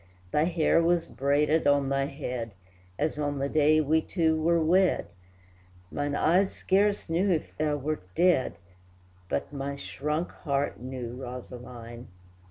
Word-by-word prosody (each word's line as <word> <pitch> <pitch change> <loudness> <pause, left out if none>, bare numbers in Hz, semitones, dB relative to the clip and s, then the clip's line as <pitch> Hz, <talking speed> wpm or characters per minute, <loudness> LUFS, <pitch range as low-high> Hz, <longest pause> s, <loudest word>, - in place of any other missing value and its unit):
Thy 150 - +3
hair 165 -1 +3
was 170 0 +2
braided 145 +3 +1
on 140 -1 +3
thy 135 0 +1
head, 125 -6 -5 0.4
As 150 0 -1
on 145 -1 -1
the 140 0 -1
day 155 +1 +4
we 155 +1 +2
two 160 -3 +1
were 165 +2 +2
wed, 180 +3 +3 0.9
Mine 145 0 -2
eyes 185 +6 +3
scarce 200 +2 +1
knew 175 +4 +1
if 165 -4 -1
thou 150 -1 0
wert 150 +2 -3
dead, 175 - +3 0.7
But 70 - -2
my 140 0 -3
shrunk 150 +4 -3
heart 140 -2 -2
knew, 125 -1 -6
Rosaline! 120 -1 -8
150 Hz, 140 wpm, -28 LUFS, 135-165 Hz, 0.9 s, day